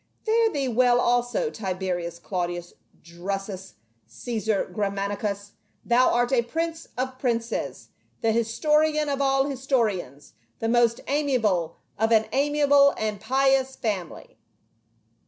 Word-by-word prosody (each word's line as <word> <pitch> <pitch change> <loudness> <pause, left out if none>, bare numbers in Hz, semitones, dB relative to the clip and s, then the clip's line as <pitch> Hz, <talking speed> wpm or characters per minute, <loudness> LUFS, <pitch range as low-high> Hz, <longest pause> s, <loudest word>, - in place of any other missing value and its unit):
" - - -44
P'are 450 0 +3
thee 280 -5 -1
well 245 0 +3
also, 245 - +1
Tiberius 185 -4 -3
Claudius 175 -1 -4 0.3
Drusus 190 - -6 0.3
Caesar 215 - -2
Germanicus, 200 0 -2 0.3
thou 245 +2 +4
art 245 +1 +1
a 245 - +4
prince 325 +6 -4
of 255 0 -3
princes, 230 -3 -2 0.3
the 225 -2 +2
historian 300 +7 +1
of 280 0 -1
all 270 0 +3
historians, 230 - -2 0.2
the 225 - -2
most 235 0 +3
amiable 225 - 0 0.2
of 225 +1 +2
an 220 -1 +5
ami 290 +2 +1
able 280 -1 +5
and 215 -2 -3
pious 265 0 +2
family." 200 -7 -5
235 Hz, 120 wpm, -25 LUFS, 200-270 Hz, 0.3 s, an